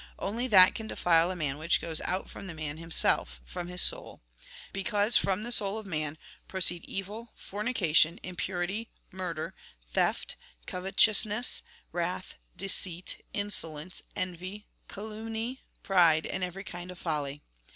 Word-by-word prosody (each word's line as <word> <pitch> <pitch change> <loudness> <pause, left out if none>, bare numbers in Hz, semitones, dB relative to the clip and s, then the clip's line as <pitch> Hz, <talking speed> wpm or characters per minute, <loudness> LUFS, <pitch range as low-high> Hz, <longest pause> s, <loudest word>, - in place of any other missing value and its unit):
Only 230 +6 -2
that 190 -6 +8
can 220 - -5
defile 170 -4 +3
a 185 - -3
man 150 -4 -2
which 165 +2 +3
goes 165 -2 -3
out 185 +2 -2
from 195 - -9
the 170 - -6
man 155 -1 -4
himself, 160 - +2
from 175 - -5
his 180 0 +4
souL - - -1 0.5
Because 205 +2 +3
from 195 +2 +3
the 240 - -4
soul 205 -3 +3
of 220 - -6
man 155 -4 -2 0.3
proceed 175 -2 +3
evil, 210 +4 -5
fornication, 190 -7 +2
impurity, 185 +4 -3 0.2
murder, 180 -4 -4 0.4
theft, - - 0 0.3
covetousness, 210 +4 +2 0.3
wrath, 175 +2 -3 0.2
deceit, 185 -2 0
insolence, 180 -5 +1
envy, 185 +3 -4 0.2
calumny, 220 +4 -5 0.2
pride, 170 -5 +4
and 190 - -3
every 180 +2 -4
kind 175 -2 -7
of 180 - -8
folly. 150 -4 -3
185 Hz, 135 wpm, -30 LUFS, 165-205 Hz, 0.5 s, that